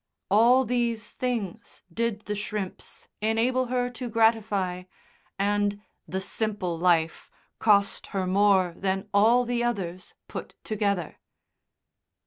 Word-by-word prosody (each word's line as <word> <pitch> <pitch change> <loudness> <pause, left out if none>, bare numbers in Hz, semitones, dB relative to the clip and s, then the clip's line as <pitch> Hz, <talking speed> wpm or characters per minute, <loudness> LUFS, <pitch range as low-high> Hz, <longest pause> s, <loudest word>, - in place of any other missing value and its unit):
All 240 +5 +5
these 235 -2 -1
things 235 -8 -4
did 230 0 -1
the 210 - -4
shrimps 210 -2 -5
enable 235 +4 +1
her 245 0 0
to 245 0 -6
gratify, 215 -5 +1 0.5
and 205 0 +1 0.3
"the 190 - -2
simple 200 -3 -2
life" 165 -2 +1 0.3
cost 200 -2 +3
her 195 -2 -2
more 190 -2 +3
than 190 0 -2
all 230 +5 +5
the 240 0 -1
others 185 -6 -3
put - - -7
together. 200 -6 -2
210 Hz, 115 wpm, -26 LUFS, 190-230 Hz, 0.5 s, All